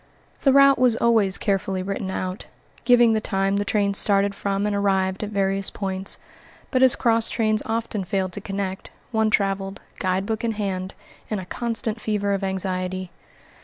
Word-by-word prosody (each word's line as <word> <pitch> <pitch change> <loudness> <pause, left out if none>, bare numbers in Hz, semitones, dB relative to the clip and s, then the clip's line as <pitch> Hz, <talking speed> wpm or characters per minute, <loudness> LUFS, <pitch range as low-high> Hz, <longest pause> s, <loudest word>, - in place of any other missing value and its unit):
The 275 - +4
route 275 0 +6
was 250 -3 +4
always 220 -5 +4
carefully 195 -2 -1
written 195 0 -4
out, 185 0 -4 0.4
giving 240 -2 +5
the 220 - 0
time 195 -1 0
the 205 - 0
trains 200 0 +3
started 200 -1 +2
from 200 0 -2
and 210 -1 0
arrived 190 -2 0
at 210 - -4
various 195 -1 0
points; 190 -1 -2 0.5
but 255 - +1
as 260 -1 +6
cross 230 -1 +1
trains 215 -2 +1
often 225 -2 -2
failed 185 0 -2
to 205 - -5
connect, 195 -1 -4 0.2
one 220 -1 +2
traveled, 195 -1 -1 0.2
guidebook 195 +5 -1
in 230 -1 0
hand, 190 -3 -4 0.3
in 215 - -1
a 190 - -6
constant 225 +1 -2
fever 205 -2 -1
of 195 0 -2
anxiety. 185 -1 -3
200 Hz, 165 wpm, -23 LUFS, 190-220 Hz, 0.5 s, route